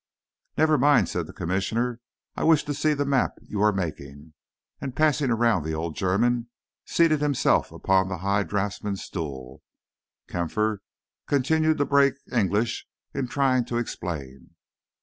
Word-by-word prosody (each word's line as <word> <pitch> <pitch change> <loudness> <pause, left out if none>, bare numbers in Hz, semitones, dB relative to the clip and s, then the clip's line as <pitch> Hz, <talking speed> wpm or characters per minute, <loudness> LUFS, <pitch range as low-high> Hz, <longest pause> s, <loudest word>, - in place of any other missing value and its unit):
"Never 155 -1 +4
mind," 145 0 +4
said - - -3
the - - -9
Commissioner, 115 +7 -1 0.4
"I - - -3
wish 160 -2 +4
to 145 - -3
see 150 +2 +1
the 145 0 -1
map 135 -2 +1
you 105 - -3
are 105 0 +5
making"; 75 -5 -6 0.5
and, 130 -2 -5
passing 150 -2 +2
around 115 -3 +2
the 80 +1 -3
old 80 0 -4
German, 115 +6 +1 0.4
seated 155 -3 +3
himself 145 -3 +2
upon 95 0 +1
the 90 -1 -4
high 100 +3 +1
draughtsman's 100 0 -3
stool. 65 -7 -6 0.7
Kampfer 105 +5 -1 0.5
continued 155 +3 +2
to 145 - +1
break 140 -2 +4 0.2
English 110 +1 0 0.3
in 135 -2 -2
trying 130 -1 +2
to 120 0 -3
explain. 75 - -6
115 Hz, 145 wpm, -25 LUFS, 90-140 Hz, 0.7 s, are